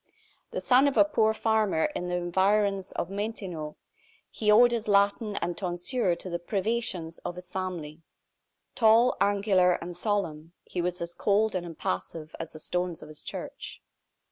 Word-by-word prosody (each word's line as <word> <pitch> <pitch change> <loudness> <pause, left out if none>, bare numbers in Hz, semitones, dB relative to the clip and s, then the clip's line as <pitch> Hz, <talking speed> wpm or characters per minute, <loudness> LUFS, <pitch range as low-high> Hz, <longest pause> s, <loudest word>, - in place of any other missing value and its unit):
The - - -4
son 260 +2 +5
of 280 - 0
a - - +7
poor 220 -8 +2
farmer 220 -6 +1
in 180 - -3
the 180 - -1
environs 195 +2 +1
of 175 - -3
Montaignac, 195 -7 -4 0.6
he 215 - -1
owed 240 +3 +7
his 230 -2 -2
Latin 205 +1 +2
and 175 - -2
tonsure 180 +2 -1
to 185 - -8
the 170 -1 -3
privations 190 -3 -2
of 175 - -5
his 180 0 -10
family. 175 -5 -5 0.7
Tall, 230 +2 +5
angular, 200 -2 +3
and 175 0 -5
solemn, 170 -5 -2
he 180 - -4
was 180 0 -2
as 170 0 -6
cold 210 +3 +2
and 180 -2 -3
impassive 155 - -4
as 165 - -6
the 155 - -9
stones 180 +1 -3
of 155 - -11
his 155 - -7
church. - - -6
185 Hz, 165 wpm, -28 LUFS, 170-215 Hz, 0.7 s, a